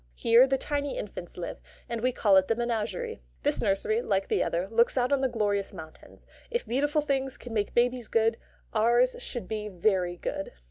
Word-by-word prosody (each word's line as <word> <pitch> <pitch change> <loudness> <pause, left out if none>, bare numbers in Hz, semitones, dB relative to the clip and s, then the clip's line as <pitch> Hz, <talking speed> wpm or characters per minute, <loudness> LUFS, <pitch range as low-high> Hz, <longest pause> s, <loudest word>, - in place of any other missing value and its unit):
Here 235 +3 +5
the 270 0 +1
tiny 285 +1 -2
infants 185 -4 -7
live, 175 - -5 0.3
and 235 -2 -3
we 255 +2 +2
call 205 -5 +3
it 190 0 +5
the 225 - +1
Menagerie. 225 - -2 0.2
This - - +2
nursery, 215 +3 +1
like 195 -4 -1
the - - +2
other, 175 +3 -1
looks 235 +3 +3
out 250 +1 +2
on 275 - +2
the 265 - +2
glorious 205 -4 -1
mountains. 160 0 -12 0.2
If 475 0 -2
beautiful 290 +5 +1
things 270 -2 -1
can 245 - -9
make 205 -2 -1
babies 245 -1 +2
good, 225 0 +2 0.4
ours 240 +3 +3
should 235 -7 -5
be 210 -1 -4
very 180 -2 0
good. 195 - -4
230 Hz, 190 wpm, -28 LUFS, 200-255 Hz, 0.4 s, Here